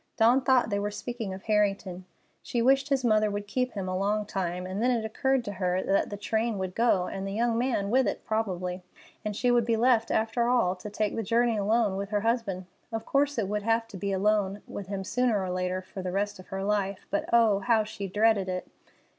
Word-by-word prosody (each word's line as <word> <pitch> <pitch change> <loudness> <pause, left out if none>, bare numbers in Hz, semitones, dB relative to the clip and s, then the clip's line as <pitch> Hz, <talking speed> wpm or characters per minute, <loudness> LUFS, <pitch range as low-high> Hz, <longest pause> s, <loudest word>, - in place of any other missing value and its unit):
Dawn 240 +4 +5
thought 255 -4 +3
they 200 - +1
were 205 +1 -1
speaking 225 0 -5
of 190 0 -7
Harrington. 195 -4 0 0.4
She 240 - -2
wished 270 +4 +3
his 270 -3 +1
mother 215 -2 +3
would 205 0 -4
keep 250 +4 -1
him 195 -3 -4
a 185 - -2
long 205 +2 0
time, 180 -3 -3
and 190 +3 -4
then 245 - +3
it 235 -3 0
occurred 265 +3 0
to 205 - -3
her 185 -1 -1
that 195 - +1
the 205 - -5
train 220 +1 -1
would 185 -1 -3
go, 215 -5 +2
and 195 +1 -5
the 195 - -4
young 230 +2 +1
man 230 -4 0
with 260 +1 +3
it - - -3
probably, 185 -4 -2 0.4
and 210 -1 -3
she 245 +3 +2
would 240 -1 +4
be 225 0 +1
left, 235 -1 +3
after 225 +2 +1
all, 235 -7 +2
to 185 +3 -7
take 210 0 -1
the 225 - -1
journey 230 +2 +2
alone 210 -1 +1
with 200 0 -4
her 205 -1 0
husband. 225 -5 -1 0.3
Of 225 0 -4
course 285 0 +1
it 215 -4 0
would 210 +1 -1
have 225 +1 +1
to 205 - -10
be 200 +2 -2
alone 200 0 +1
with 200 - -7
him 195 -1 -4
sooner 240 +1 +1
or 185 -1 -2
later, 185 +1 -2
for 190 +1 -8
the 185 -1 -3
rest 200 +1 -2
of 185 - -12
her 195 0 -4
life, 200 -1 -1
but 200 - -1
oh, 225 -4 +5
how 225 +1 +2
she 205 -2 -6
dreaded 205 0 +2
it! 180 0 -3
210 Hz, 235 wpm, -28 LUFS, 195-230 Hz, 0.4 s, Dawn